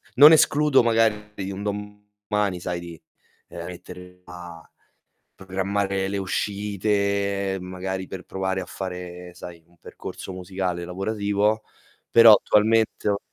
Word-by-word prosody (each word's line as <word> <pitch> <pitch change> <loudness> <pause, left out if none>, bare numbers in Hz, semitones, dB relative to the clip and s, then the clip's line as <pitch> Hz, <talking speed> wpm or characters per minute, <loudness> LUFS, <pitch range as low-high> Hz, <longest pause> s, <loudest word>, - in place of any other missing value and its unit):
non 145 +5 +10
escludo 150 -3 +5
magari 105 -4 0
un 100 +1 -6
domani, 105 -1 -3
sai, 90 -1 -3
di, 85 -2 -10 0.5
ehm, 85 0 -7
mettermi 90 0 -11
a 85 -2 -11 0.7
programmare 95 0 -2
le 100 0 -2
uscite 100 0 -1
magari 95 +1 -5
per 95 - -8
provare 95 0 -2
a 90 - -6
fare, 90 -1 -7
sai, 85 -2 -10
un 85 0 -27
percorso 95 - -9
musicale 90 -1 -3
lavorativo, 105 +3 -1 0.5
però 115 -1 +9
attualmente 110 +2 +2
ho 100 -1 +1
95 Hz, 115 wpm, -24 LUFS, 90-105 Hz, 0.7 s, non